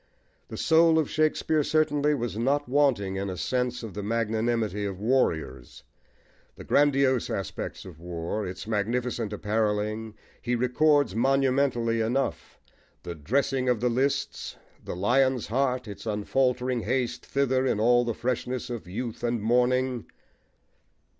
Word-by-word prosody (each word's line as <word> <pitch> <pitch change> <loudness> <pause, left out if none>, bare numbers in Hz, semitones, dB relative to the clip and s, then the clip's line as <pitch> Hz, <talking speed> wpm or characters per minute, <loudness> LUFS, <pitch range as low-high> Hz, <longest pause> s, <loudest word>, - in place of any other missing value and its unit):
The - - -8
soul 165 -1 +4
of 155 -3 0
Shakespeare, 155 0 +1
certainly, 150 -1 +2
was 120 -5 -3
not 140 +6 0
wanting 125 -8 +1
in 100 0 -3
a 90 - -5
sense 125 +1 -1
of 110 -4 -7
the 105 - -5
magnanimity 110 -1 -1
of 100 -2 -4
warriors. 80 - -1 0.7
The - - -10
grandiose 140 -3 +2
aspects 95 - -5
of 85 -5 -11
war, 85 +4 -4
its 90 - -7
magnificent 115 +1 -1
apparelling, 105 +1 -1 0.3
he 125 0 -1
records 140 +1 +2
monumentally 130 -2 +1
enough 125 +5 -2 0.4
the 85 - -5
"dressing 130 - 0
of 125 -3 +2
the 125 +2 +1
lists," 130 +4 -1 0.3
the - - -5
lion's 125 +5 +2
heart, 125 +1 0
its 105 +2 -8
unfaltering 125 +4 0
haste 125 +2 -1
thither 130 -1 +1
in 105 - 0
all 120 +2 +4
the 120 -2 -2
freshness 125 +1 -3
of 115 -6 -6
youth 115 +5 -5
and 120 -1 0
morning. 125 +2 +1
120 Hz, 135 wpm, -27 LUFS, 105-130 Hz, 0.7 s, soul